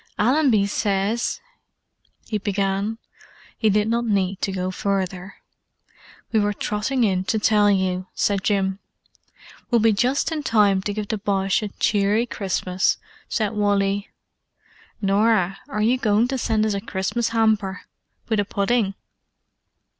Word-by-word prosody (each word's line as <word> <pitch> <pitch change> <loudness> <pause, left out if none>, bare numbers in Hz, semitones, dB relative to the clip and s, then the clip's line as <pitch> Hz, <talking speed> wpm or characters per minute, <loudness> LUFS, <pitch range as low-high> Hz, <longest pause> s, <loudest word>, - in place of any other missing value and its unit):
"Allenby 245 -4 +3
says——" 205 - -1 0.8
he 215 - -2
began. 200 +1 -1 0.6
He 220 - +2
did 210 +1 +2
not 235 +1 +1
need 195 -4 0
to 195 - -1
go 185 -1 -2
further. 190 -1 -3 1.0
"We 220 - +3
were 205 0 +1
trotting 215 +6 -1
in 190 -4 +1
to 220 +1 0
tell 210 -1 +3
you," 185 -2 0
said 200 -2 0
Jim. 195 -2 0 0.9
"We'll 240 - +3
be 225 0 +4
just 255 +10 +1
in 315 -2 -2
time 210 -7 +3
to 205 +1 -3
give 210 -1 -4
the 220 -3 -2
Boche 195 0 0
a 210 - -2
cheery 205 +2 +1
Christmas," 190 -4 -1 0.3
said 215 -4 0
Wally. 200 -1 0 0.9
"Norah, 195 -1 +2
are 210 -6 -1
you 245 +4 +2
going 220 0 +2
to 265 - -1
send 220 -2 +1
us 215 - 0
a 200 - -2
Christmas 215 +3 -2
hamper? 220 -4 +1 0.5
With 220 -3 0
a - - +3
pudding?" 200 0 0
205 Hz, 140 wpm, -22 LUFS, 195-225 Hz, 1.0 s, be